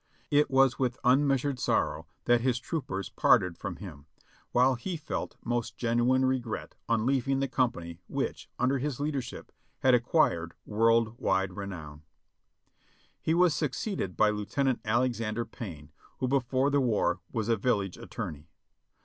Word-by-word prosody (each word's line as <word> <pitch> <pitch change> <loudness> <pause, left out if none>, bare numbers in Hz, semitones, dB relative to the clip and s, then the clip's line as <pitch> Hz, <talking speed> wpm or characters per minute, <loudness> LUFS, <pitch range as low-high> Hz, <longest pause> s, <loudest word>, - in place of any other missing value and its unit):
It 145 0 +4
was 135 -1 +4
with 130 -1 0
unmeasured 135 0 +3
sorrow 80 -7 0 0.2
that 120 0 +4
his 125 -1 +1
troopers 120 - -4
parted 90 -2 +3
from 100 -1 -5
him, 80 -6 -10 0.4
while 125 +2 +4
he 165 +9 -4
felt 155 - -5
most 120 -1 -2
genuine 120 +2 +2
regret 130 -3 -2 0.2
on 115 -1 +2
leaving 135 +1 +1
the 135 - 0
company 85 -11 -1
which, - - -3
under 130 +2 +1
his 140 -1 -3
leadership, 145 -3 -4 0.3
had 130 - +5
acquired 120 - +2
v/orld 115 +2 +2
wide 95 -1 +1
renown. 85 -7 -7 1.2
He 160 - +1
was 175 -2 +5
succeeded 150 - -2
by 105 0 +5
Lieutenant 115 +6 -1
Alexander 115 -1 0
Payne, 85 -10 -9 0.3
who 130 - -1
before 130 +1 +1
the 140 0 +3
war 105 -7 +1
was 110 -3 -2
a 115 - +3
village 100 -4 0
attorney. 75 +1 -7
120 Hz, 140 wpm, -29 LUFS, 100-135 Hz, 1.2 s, had